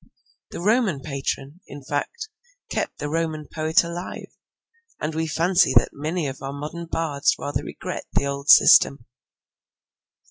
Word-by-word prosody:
The - - -7
Roman 210 - +2
patron, 140 +2 -4
in 140 0 -10
fact, 145 - -3 0.4
kept - - -2
the 145 - -4
Roman 155 -1 -2
poet 160 +1 +2
alive, 170 +2 -7 0.6
and 155 +1 -3
we 160 +1 -1
fancy 170 0 +2
that 120 - +4
many 155 +3 -3
of 135 0 -7
our 135 0 -4
modern 155 +4 -6
bards 155 -4 0
rather 145 - -3
regret - - -6
the - - +1
old 140 0 -4
system. 140 -4 +7
155 Hz, 140 wpm, -23 LUFS, 140-170 Hz, 0.6 s, system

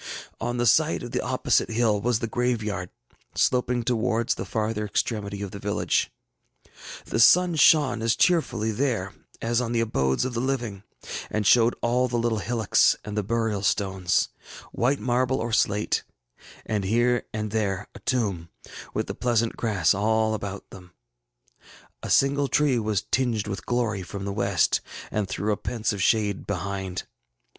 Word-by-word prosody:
ŌĆ£On 120 +2 -2
the 120 - +1
side 115 - +3
of - - -7
the - - -1
opposite - - +1
hill 110 -3 +1
was 120 0 +1
the 115 - -3
graveyard, 110 -7 -1 0.5
sloping 125 -1 +1
towards 115 -1 +1
the - - -6
farther 110 -1 -1
extremity 100 -1 -2
of 100 - -6
the 100 - -8
village. 100 +1 0 0.9
The - - -2
sun 175 +9 +6
shone 145 -5 +4
as 115 0 +2
cheerfully 120 - +2
there 110 -5 -1 0.3
as 120 +1 +1
on 120 -1 -2
the 115 - +1
abodes 65 - +1
of 130 - -3
the 115 - -2
living, 120 -6 -2 0.5
and 105 -1 -1
showed 120 +2 +5
all 125 +2 +2
the 120 -1 -2
little 115 -2 0
hillocks 110 0 +3
and 105 - -5
the 105 - +1
burial 110 -1 -1
stones, 95 -3 +1 0.4
white 135 +4 +1
marble 125 +1 +1
or 115 0 -3
slate, 105 0 +1 0.6
and 105 -2 -1
here 120 +4 +1
and 105 -1 -4
there 105 -2 -1
a - - -11
tomb, 100 -10 -1 0.5
with - - 0
the - - -5
pleasant 115 -2 0
grass 100 -8 +2
about 110 -1 -1
them 90 -2 -13 0.6
all. - - -44 0.4
A - - -6
single 140 +1 +3
tree 140 -3 +2
was 105 -2 -1
tinged 120 -5 +1
with 100 -2 -5
glory 115 -5 0
from 100 +2 -6
the 100 - -3
west, 100 -4 +1 0.3
and 105 -2 -1
threw 105 +2 -2
a - - -3
pensive 110 -4 -2
shade 105 -1 +1
behind. 95 -1 -3
110 Hz, 160 wpm, -25 LUFS, 100-120 Hz, 0.9 s, sun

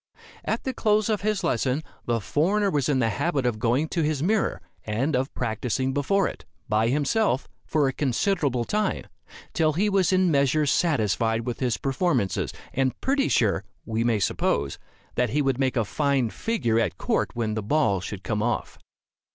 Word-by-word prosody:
At - - -2
the 260 - -2
close 215 -2 +2
of 215 -2 0
his 210 -2 0
lesson, 135 -1 0 0.2
the 120 -1 +1
foreigner 190 - +1
was 145 -3 0
in 140 - +2
the 115 -3 +2
habit 140 +5 -1
of 115 -3 0
going 125 +7 +1
to 170 - -1
his 150 -2 0
mirror, 210 +3 +1 0.2
and 125 +8 -1
of 130 +2 0
practicing 125 +3 -1
before 180 +8 +2
it, - - -8 0.2
by 110 -1 +2
himself, 145 - +1 0.2
for 150 -3 +2
a 135 - -1
considerable 140 -2 0
time, 210 - -1 0.5
till 155 -2 +2
he 205 +6 +1
was 190 -3 +3
in 185 0 +3
a 180 -2 +3
measure 140 +1 +3
satisfied 115 - +1
with 120 -2 -3
his 125 -3 0
performances, 135 - 0 0.2
and 130 -1 0
pretty 275 +1 +1
sure, 100 -5 +2 0.2
we 115 0 -1
may 115 -2 +2
suppose, 70 -6 0 0.3
that 125 - +1
he 150 - +1
would 135 -2 0
make 130 -1 +1
a 115 - +2
fine 140 -1 0
figure 120 - 0
at 115 - -1
court - - 0
when 115 -2 -1
the 110 - -2
ball 105 -4 +1
should 95 +1 -6
come 105 +3 -1
off. 120 +1 -2
135 Hz, 185 wpm, -25 LUFS, 115-170 Hz, 0.5 s, was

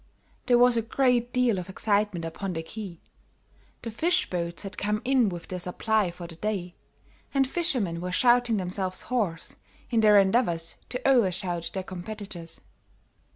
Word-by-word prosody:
There 245 -1 +5
was 245 0 +5
a - - +3
great 245 +1 +1
deal 245 -6 +2
of 180 +1 -7
excitement 200 -3 0
upon 180 +3 -4
the 165 -1 -4
quay 190 -2 -8 0.8
the 230 - -4
fish 355 +10 +1
boats 170 0 -3
had 195 - -7
come 210 +1 -1
in 255 -4 +3
with 175 -2 -7
their 185 - -4
supply 200 +3 0
for 175 0 -9
the 165 -1 -10
day, 190 -3 -3 0.6
and 270 -1 +3
fishermen 245 - -1
were 180 0 -3
shouting 240 +2 +3
themselves 185 0 -2
hoarse 200 -10 -2 0.3
in 230 - +3
their 210 -2 +7
endeavors 190 -5 +1
to 250 +1 -2
over 240 -8 +5
shout 175 -2 -2
their 190 - -2
competitors. 185 -2 -7
200 Hz, 160 wpm, -27 LUFS, 180-240 Hz, 0.8 s, their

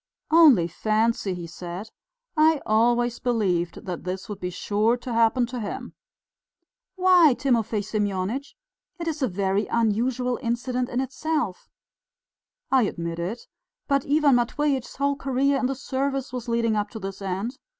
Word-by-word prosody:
"Only 295 - +7
fancy," 215 +1 0
he 175 -1 -6
said, 175 +5 -7 0.4
"I 310 0 +4
always 240 +2 +2
believed 190 -8 -1
that 180 -4 -5
this 185 +4 -4
would 205 -3 -6
be 180 - -3
sure 210 +6 +1
to 245 0 -6
happen 230 +2 +3
to 245 +1 -6
him." 210 - -5 1.0
"Why, 360 -7 +6
Timofey 230 -5 +1
Semyonitch? 210 +5 -2 0.4
It 335 - -4
is 315 -2 -3
a 260 - +2
very 195 +1 0
unusual 240 +3 0
incident 245 +1 -1
in 245 - -1
itself...." 265 - -3 1.0
"I 265 -1 +5
admit 170 -5 -3
it. 190 +8 -4 0.4
But 275 -1 +1
Ivan 290 -3 +4
Matveitch's 265 +2 -1
whole 280 +1 +1
career 275 +1 +1
in 255 - +1
the 270 - -2
service 270 0 -2
was 245 -2 -5
leading 230 -1 +1
up 205 0 -1
to 220 - -8
this 195 0 -6
end. 195 +7 -3
235 Hz, 150 wpm, -25 LUFS, 205-265 Hz, 1.0 s, Only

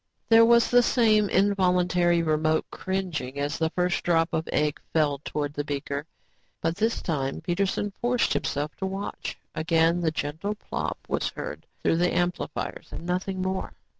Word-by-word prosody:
There 225 0 +8
was 235 0 +5
the 245 0 +7
same 215 -4 +3
involuntary 180 -3 +3
remote 155 0 +1
cringing 180 -9 -3
as 145 +1 -2
the 160 -1 +2
first 180 +2 0
drop 165 -1 +3
of 160 0 -1
egg 150 -1 0
fell 150 -3 +2
towards 145 -1 -3
the 145 - -2
beaker, 145 +1 -4 0.5
but 165 0 -1
this 225 +4 0
time, 135 -5 -1
Peterson 195 +3 -1
forced 245 0 +2
himself 145 +1 -2
to 190 - -2
watch. 195 +1 -5 0.2
Again 165 +2 +2
the 165 - +2
gentle 160 +7 -3
plop - - -4
was - - 0
heard - - -7 0.2
through 165 - +3
the 175 +1 +2
amplifiers 175 0 -2
and 170 - -7
nothing 185 +1 -2
more. 190 0 -2
175 Hz, 160 wpm, -26 LUFS, 155-195 Hz, 0.5 s, There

